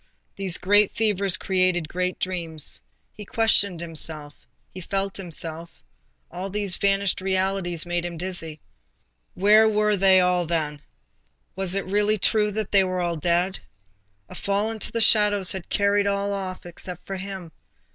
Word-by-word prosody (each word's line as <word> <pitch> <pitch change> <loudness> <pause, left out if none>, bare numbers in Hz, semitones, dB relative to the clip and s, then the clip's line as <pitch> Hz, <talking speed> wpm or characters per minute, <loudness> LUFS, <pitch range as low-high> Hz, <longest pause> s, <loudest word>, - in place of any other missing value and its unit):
These 190 -3 -2
great 205 +2 +3
fevers 200 -4 +1
create 185 -3 0
great 180 +2 -2
dreams. 165 - -1 0.3
He 210 - -10
questioned 205 -4 +3
himself; 155 -3 -5 0.4
he 185 - -8
felt 195 +2 -2
himself; 165 -2 -3 0.6
all 185 +3 -5
these 200 -2 -2
vanished 195 -1 +1
realities 190 -3 -1
made 175 0 -2
him 175 -1 -5
dizzy. 165 -3 -3 0.8
Where 215 +3 +5
were 210 0 +2
they 190 -1 +5
all 180 -1 +1
then? 150 -3 -2 0.7
was 190 -1 -1
it 195 - -2
really 205 +3 +1
true 210 +1 +2
that 215 0 -4
all 195 -1 +5
were 180 -2 -1
dead? 175 +4 0 0.7
A - - -12
fall 200 +2 -1
into 220 -2 -5
the 230 - -1
shadows 205 -3 +4
had 190 -3 -6
carried 200 0 +2
off 200 0 -1
all 190 -2 -4
except 175 0 -9
himself. 190 -3 -6
190 Hz, 145 wpm, -24 LUFS, 175-200 Hz, 0.8 s, Where